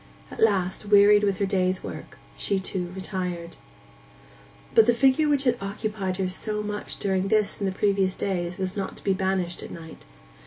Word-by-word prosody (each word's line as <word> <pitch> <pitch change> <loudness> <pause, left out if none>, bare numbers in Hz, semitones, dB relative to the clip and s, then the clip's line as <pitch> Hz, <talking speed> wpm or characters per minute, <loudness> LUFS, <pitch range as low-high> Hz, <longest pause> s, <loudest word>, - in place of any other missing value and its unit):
At - - -10
last, 195 -2 +1
wearied 205 0 +6
with 200 -2 +1
her 200 - +1
day's 185 -1 0
work, - - -8 0.2
she 200 - -1
too 185 -2 -3
retired. 180 -3 -4 1.2
But 450 - +6
the 240 - +4
figure 270 +5 +3
which 285 -2 +2
had 245 -2 +1
occupied 195 -2 -3
her 190 -1 0
so 210 +3 -1
much 210 0 -5
during 190 -1 0
this 215 0 +1
and 200 - -1
the - - 0
previous 195 -1 +1
days 175 -3 -2
was 190 -1 -3
not 195 -2 -4
to - - -13
be 195 - +2
banished 190 -2 -1
at - - -8
night. 160 -1 -11
195 Hz, 185 wpm, -25 LUFS, 185-210 Hz, 1.2 s, wearied